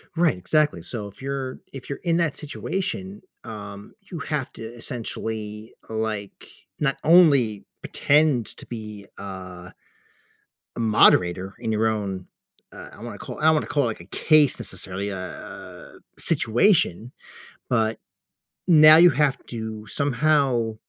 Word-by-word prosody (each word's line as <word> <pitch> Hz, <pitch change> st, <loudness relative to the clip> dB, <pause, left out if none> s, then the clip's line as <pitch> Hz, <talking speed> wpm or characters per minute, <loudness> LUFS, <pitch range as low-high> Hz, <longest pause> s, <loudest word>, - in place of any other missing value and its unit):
Right. 165 Hz, -, +2 dB
Exactly. 150 Hz, -, +1 dB
So, 105 Hz, -4 st, -5 dB
if 100 Hz, -, -15 dB
you're 135 Hz, -1 st, -4 dB
if 135 Hz, 0 st, -9 dB
you're 140 Hz, -, -4 dB
in 170 Hz, -1 st, +1 dB
that 165 Hz, -4 st, 0 dB
situation, 190 Hz, +5 st, -4 dB, 0.2 s
um, 100 Hz, -2 st, -9 dB, 0.2 s
you 170 Hz, -, -5 dB
have 145 Hz, -4 st, -3 dB
to 115 Hz, -, -9 dB
essentially, 110 Hz, -2 st, -6 dB, 0.2 s
like, 110 Hz, -2 st, -4 dB, 0.3 s
not 140 Hz, -2 st, 0 dB
only 140 Hz, -, +5 dB, 0.2 s
pretend 145 Hz, -6 st, +2 dB
to -, -, -8 dB
be 105 Hz, -3 st, -8 dB
a 90 Hz, -2 st, -9 dB, 1.0 s
a -, -, -5 dB
moderator 95 Hz, -4 st, +3 dB
in 110 Hz, -, -3 dB
your 110 Hz, +1 st, +1 dB
own 100 Hz, -4 st, -3 dB, 0.5 s
uh, -, -, -10 dB
I -, -, -12 dB
don't -, -, -10 dB
wanna -, -, -8 dB
call -, -, -8 dB
I -, -, -6 dB
don't 160 Hz, 0 st, +6 dB
wanna 155 Hz, -, 0 dB
call 145 Hz, -, +1 dB
it, -, -, +1 dB
like, 110 Hz, -, -4 dB
a 85 Hz, -, -12 dB
case 150 Hz, -, +3 dB
necessarily 95 Hz, +2 st, -3 dB
a 95 Hz, -2 st, -9 dB, 0.2 s
situation, 120 Hz, -, +2 dB, 0.6 s
but 110 Hz, -2 st, +1 dB, 0.7 s
now 155 Hz, -2 st, +8 dB
you 175 Hz, +1 st, +8 dB
have 140 Hz, 0 st, +1 dB
to 110 Hz, -2 st, -6 dB
somehow 135 Hz, -4 st, +1 dB
115 Hz, 140 wpm, -24 LUFS, 105-150 Hz, 1.0 s, now